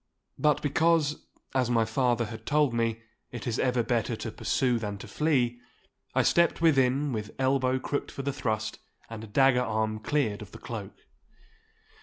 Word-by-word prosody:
But 150 -1 +2
because, 155 0 +2 0.3
as 130 -2 +1
my 115 -2 +3
father 120 +1 +1
had 110 0 -9
told 150 -4 +3
me, 115 -1 -1 0.3
it 120 -2 -7
is 120 -2 -1
ever 125 -2 +2
better 115 -1 0
to - - -5
pursue 125 -3 0
than 105 -2 -4
to - - -10
flee, 125 -6 +1 0.6
I - - +4
stepped 170 -1 +3
within 140 -3 +3
with 105 -1 -5
elbow 130 -1 +2
crooked 140 +2 -3
for 135 - -6
the 140 0 -1
thrust, 110 -4 -2 0.3
and 110 -1 -8
dagger 135 +1 +4
arm 110 -2 -1
cleared 110 -5 0
of 105 -1 -11
the - - -8
cloak. 110 -5 -7
125 Hz, 165 wpm, -28 LUFS, 110-140 Hz, 0.6 s, I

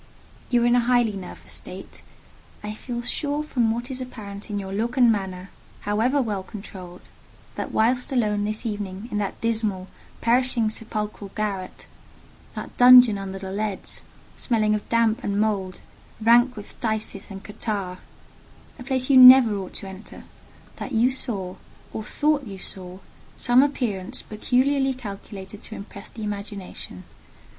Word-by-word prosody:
You 240 -1 +3
are - - +3
in 240 - +4
a 245 - +5
highly 240 -2 +3
nervous 190 -3 -9
state. - - -7 0.6
I 210 0 -4
feel 240 +2 -5
sure 290 +4 -1
from 245 -7 +1
what 240 +3 -3
is 260 0 -4
apparent 210 -5 -7
in 205 - -2
your 195 -1 -5
look 230 +5 -2
and 245 -2 +6
manner, 190 -2 -3 0.3
however 225 +7 +1
well 205 -4 -2
controlled, 185 -3 -10 0.5
that - - -4
whilst 245 +4 +2
alone 210 -5 +1
this 215 +3 -2
evening 205 0 -4
in 210 - -1
that 200 -2 -3
dismal, 215 -5 0 0.3
perishing 235 -2 +2
sepulchral 215 -2 -4
garret—that 200 -4 -7
dungeon 245 -4 +8
under 195 0 -5
the 190 0 -6
leads, 205 -1 -3 0.3
smelling 215 -3 +1
of 210 -1 -3
damp 230 +1 +2
and 200 0 0
mould, 200 -4 -1 0.4
rank 240 +3 +5
with 210 -1 -10
phthisis 220 -1 -2
and 195 -1 -8
catarrh: 200 -4 -4 0.8
a - - -7
place 260 -1 +1
you 265 - +7
never 255 -3 +10
ought 190 -2 -5
to 195 - -4
enter—that 190 +6 -10
you 235 +3 +4
saw, 200 -8 -3 0.4
or 220 - -4
thought 290 +1 0
you 195 -2 -7
saw, 185 -1 -7 0.4
some 245 +1 +5
appearance 230 -10 -1
peculiarly 265 +5 +1
calculated 200 -3 -8
to 220 - -8
impress 200 0 -10
the 225 - -8
imagination. 200 - -6
215 Hz, 150 wpm, -24 LUFS, 200-245 Hz, 0.8 s, never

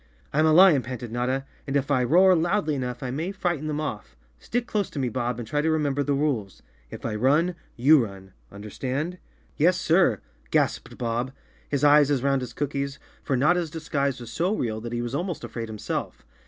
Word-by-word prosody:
"I'm 155 +2 +3
a - - +4
lion," 170 -4 +7
panted 120 -1 -6
Notta, 130 +3 -1 0.2
"and 140 +1 +1
if 140 +1 -2
I 130 -3 +3
roar 185 +8 +5
loudly 170 -1 +1
enough 125 -2 -4
I 125 - -3
may 160 +8 -3
frighten 175 -6 -2
them 150 -1 -2
off. 105 - -5 0.2
Stick 245 +1 -2
close 210 -4 -1
to - - -10
me, 130 -3 0
Bodb, 120 0 -2
and 120 -2 -6
try 145 +6 0
to 160 - +1
remember 145 -3 +1
the 140 0 0
rules. 135 -10 -2 0.3
If - - -9
I 115 - -2
run, 145 +11 +2 0.2
you 140 +2 +5
run 95 -3 -9 0.2
—understand?" 130 - -4 0.4
"Yes, 180 +4 +3
sir!" 165 - +3 0.3
gasped - - 0
Bob, 120 +2 -2 0.4
his 145 0 -1
eyes 145 -1 +6
as 135 -3 +1
round 135 -1 +2
as 125 -2 -5
cookies, 140 0 -3 0.2
for 135 - -1
Notta's 170 +5 +2
disguise 140 -4 -2
was 120 -1 -9
so 180 - 0
real 110 - -2
that 120 +1 -6
he 120 0 -2
was 120 +1 -4
almost 175 +3 -3
afraid 115 -2 -5
himself. 110 -1 -5
140 Hz, 200 wpm, -25 LUFS, 120-160 Hz, 0.4 s, lion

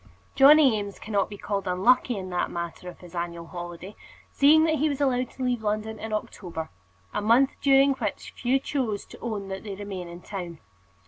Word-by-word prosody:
Johnny 275 -3 +7
Eames 200 -1 -6
cannot 205 -2 -1
be 205 - -8
called 200 -1 -3
unlucky 235 +6 +3
in 185 -1 -6
that 180 - 0
matter 170 +1 -5
of 175 - -13
his 175 -1 -13
annual 170 -1 -4
holiday, 175 +3 -8 0.4
seeing 305 +3 +6
that 315 -2 +2
he 310 +2 +2
was 285 -1 -3
allowed 255 -3 +1
to 260 - -7
leave 245 -2 0
London 215 +1 -2
in 220 - -6
October, 175 - -5 0.4
a - - -1
month 235 +6 +4
during 275 0 +5
which 220 -6 -4
few 250 +2 +1
chose 255 -7 -2
to - - -14
own 210 -4 -4
that 190 0 -5
they 205 -3 -6
remain 195 -3 -6
in 170 0 -9
town. 175 -3 -7
210 Hz, 195 wpm, -26 LUFS, 180-255 Hz, 0.4 s, Johnny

